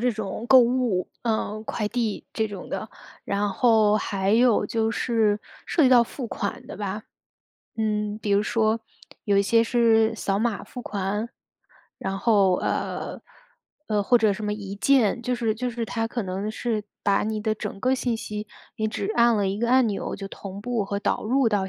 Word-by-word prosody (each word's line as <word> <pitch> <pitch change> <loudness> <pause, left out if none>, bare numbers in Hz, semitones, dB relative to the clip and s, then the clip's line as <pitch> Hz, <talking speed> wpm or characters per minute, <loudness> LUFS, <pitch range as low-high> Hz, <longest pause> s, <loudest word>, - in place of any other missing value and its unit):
这 250 +1 +2
种 215 -1 -5
购 260 - +9
物， 240 -6 +2
呃， 220 -2 -1
快 215 -1 -2
递 225 -2 -2
这 220 -1 -1
种 200 -3 -8
的， 215 - -4 0.4
然 200 +1 0
后 215 0 +4
还 195 -1 -1
有 230 -2 +4
就 225 +1 0
是 220 -3 +1 0.3
涉 315 - +3
及 - - +6
到 245 -2 +7
付 245 +2 -6
款 200 -2 -4
的 - - -8
吧。 205 +1 -4 0.7
嗯， 210 -1 -1
比 210 -2 -1
如 200 +1 +4
说 220 0 +1 0.4
有 200 -2 +2
一 200 - +4
些 230 +3 +4
是 225 -2 +3
扫 195 -2 -1
码 225 -1 -1
付 245 - -8
款， 205 +2 -2 0.7
然 195 0 -3
后， 200 -5 +4
呃 - - -3 0.7
呃 210 -2 +1
或 245 +3 +4
者 220 -2 +3
什 210 +2 -5
么 210 - -1
一 200 -2 -6
键 240 0 +3
就 250 - -1
是 230 -3 0
就 250 +2 -2
是 235 -1 -3
它 225 +2 -2
可 235 -1 -3
能 190 +3 -3
是 220 -1 -2 0.2
把 200 -1 +3
你 215 0 -2
的 215 0 0
整 210 -2 -6
个 255 +1 +2
信 245 -3 -1
息， 210 -1 -6 0.3
你 220 0 0
只 215 -1 -3
按 235 -1 +4
了 200 -1 +1
一 195 +2 -2
个 235 0 +1
按 255 -1 +5
钮 205 -2 -3
就 195 - -6
同 195 0 -8
步 230 -1 -1
和 200 +1 -2
导 - - -1
入 255 +2 +3
到 200 -3 0
215 Hz, 210 characters per minute, -25 LUFS, 205-235 Hz, 0.7 s, 购